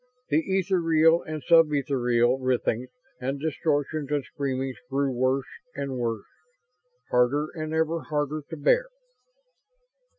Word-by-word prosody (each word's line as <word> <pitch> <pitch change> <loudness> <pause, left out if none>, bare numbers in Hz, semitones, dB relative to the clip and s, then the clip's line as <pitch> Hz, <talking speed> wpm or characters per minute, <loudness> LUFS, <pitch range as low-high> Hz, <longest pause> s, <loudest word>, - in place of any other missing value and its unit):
The 150 0 +3 0.2
ethereal 165 -3 +3
and 155 -1 -6
sub 165 -2 +5
ethereal 125 -3 +1
writhings 125 -1 0 0.3
and 135 +2 -3
distortions 150 -1 -1
and 145 -2 0
screamings 135 -1 -3
grew 140 0 0
worse 130 +2 +1 0.3
and 140 -2 -3
worse; 115 -3 -2 0.9
harder 140 +5 +2
and 155 -1 -5
ever 160 +1 0
harder 150 0 -1
to 160 - -6
bear. 485 - +3
145 Hz, 120 wpm, -26 LUFS, 130-155 Hz, 0.9 s, sub